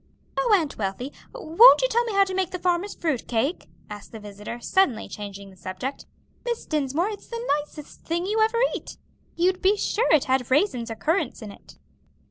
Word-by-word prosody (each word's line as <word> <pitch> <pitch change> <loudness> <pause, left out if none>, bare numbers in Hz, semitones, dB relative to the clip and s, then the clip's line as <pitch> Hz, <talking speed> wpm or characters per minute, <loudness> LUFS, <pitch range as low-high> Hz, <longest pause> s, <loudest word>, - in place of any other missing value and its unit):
"Oh, - - +1
Aunt 310 -9 -4
Wealthy, 210 +7 -3 0.2
won't 475 +3 +6
you - - +4
tell 475 0 +2
me 450 - -3
how 395 0 +5
you 380 - -4
make 375 -1 0
that 365 -2 -7
Farmer's 360 +3 0
fruit 305 -8 -2
cake?" 255 +9 -1 0.2
asked 210 -1 -10
the 225 - -8
visitor, 210 +3 -8
suddenly 265 - +1
changing 200 -1 -8
the - - -17
subject. 185 +9 -6 0.4
"Miss 475 -2 -3
Dinsmore, 305 +5 0
it's 415 - -9
the 465 - -5 0.2
nicest 300 0 -11
thing 340 +2 -2
you 430 +3 0
ever 445 +2 +2 0.2
eat. - - -8 0.4
You'd 365 +2 +1
be 400 +2 +3
sure 445 +3 0
it 305 -4 +5
had 260 -2 0
raisins 260 - +1
or 225 - -4
currants 310 - -1
in 210 - -7
it." - - -16
315 Hz, 195 wpm, -25 LUFS, -, 0.4 s, won't